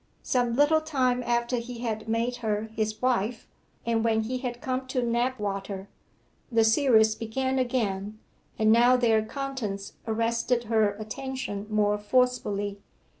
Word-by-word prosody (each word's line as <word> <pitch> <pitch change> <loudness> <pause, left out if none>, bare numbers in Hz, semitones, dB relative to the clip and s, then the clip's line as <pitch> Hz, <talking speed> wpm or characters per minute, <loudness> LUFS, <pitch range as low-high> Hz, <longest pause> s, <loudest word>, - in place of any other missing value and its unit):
Some 245 -2 +1
little 295 +3 +4
time 260 -5 +1
after 240 0 0
he 235 0 -6
had 220 -2 -3
made 235 +2 0
her 220 -2 -2
his 215 0 -1
wife, 240 -2 0 0.4
and 230 -1 +1
when 220 -1 +2
he 250 +3 -3
had 245 -2 -4
come 260 0 -3
to 255 -1 -1
Knapwater, 205 -5 -2 0.6
the 230 -1 +4
series 220 -2 +4
began 260 +4 -2
again, 215 -5 -1 0.4
and 220 -1 +4
now 240 +2 +6
their 225 -3 +3
contents 220 -6 -4
arrested 230 +2 0
her 220 -2 +2
attention 220 -2 -5
more 210 -1 +2
forcibly. 205 -3 0
230 Hz, 135 wpm, -27 LUFS, 215-250 Hz, 0.6 s, now